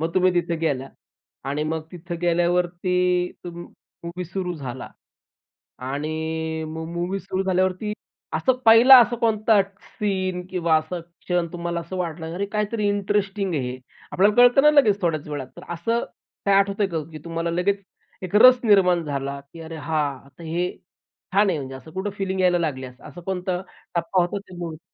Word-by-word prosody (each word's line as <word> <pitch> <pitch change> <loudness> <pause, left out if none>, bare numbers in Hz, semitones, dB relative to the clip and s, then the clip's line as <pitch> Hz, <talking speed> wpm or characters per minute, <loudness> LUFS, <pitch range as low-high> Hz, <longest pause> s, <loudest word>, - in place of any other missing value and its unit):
मग 165 +1 -1
तुम्ही 185 0 +4
तिथे 170 -1 0
गेल्या 140 -5 -1 0.6
आणि 145 +2 -1
मग 160 +1 -2
तिथं 175 0 -6
गेल्यावरती 175 +1 +1 0.5
तुम 175 -1 -7 0.4
मूव्ही 175 +2 -5
सुरू 180 0 -4
झाला. 130 -5 -6 0.9
आणि 160 +4 -3
मग 160 +1 -5
मूव्ही 175 +3 -2
सुरू 190 +1 -2
झाल्यावरती, 185 +2 0 0.4
असं 260 - +3
पहिला 235 +4 +10
असा 240 +1 +2
कोणता 220 -2 +3 0.2
सीन 185 -3 -3
किंवा 170 -3 +2
असा 155 +3 -2
क्षण 170 +1 -3
तुम्हाला 170 -1 -3
असं 170 +3 -7
वाटलं 165 -2 -4
"अरे 200 +3 -2
काहीतरी 210 0 0
इंटरेस्टिंग 200 -1 0
आहे 130 -4 -1
हे?" 125 - -7 0.3
आपल्याला 205 +3 +4
कळतंना 245 +4 +7
लगेच 225 -9 +4
थोड्याच 155 -3 -1
वेळात. 145 -3 -4
तर - - -10
असं 230 +8 -1 0.4
काही 195 0 +5
आठवतं 200 +1 +2
का, 165 -4 -2
की 155 - -7
तुम्हाला 165 0 -2
लगेच 195 +4 0 0.4
एक 185 +1 -6
रस 255 +3 +8
निर्माण 180 -5 +4
झाला? 140 -1 -3
की 145 +4 -14
"अरे 165 0 -7
हां, 145 -3 -2
तर 170 - -11
हे 175 +3 -1 0.6
छान 200 0 +4
आहे." 165 - -1
म्हणजे 135 -1 -6
असं 145 +4 -13
कुठं 190 +2 -3
फीलिंग 190 -1 -1
यायला 180 -1 +4
लागल्यात. 130 -6 -4
असं 175 - -10
कोणता 180 0 -2 0.3
टप्पा 175 +2 +1
होता 175 +3 -2
त्या 190 -2 -13
मुवीचा? 165 -3 -5
175 Hz, 165 wpm, -23 LUFS, 160-195 Hz, 0.9 s, पहिला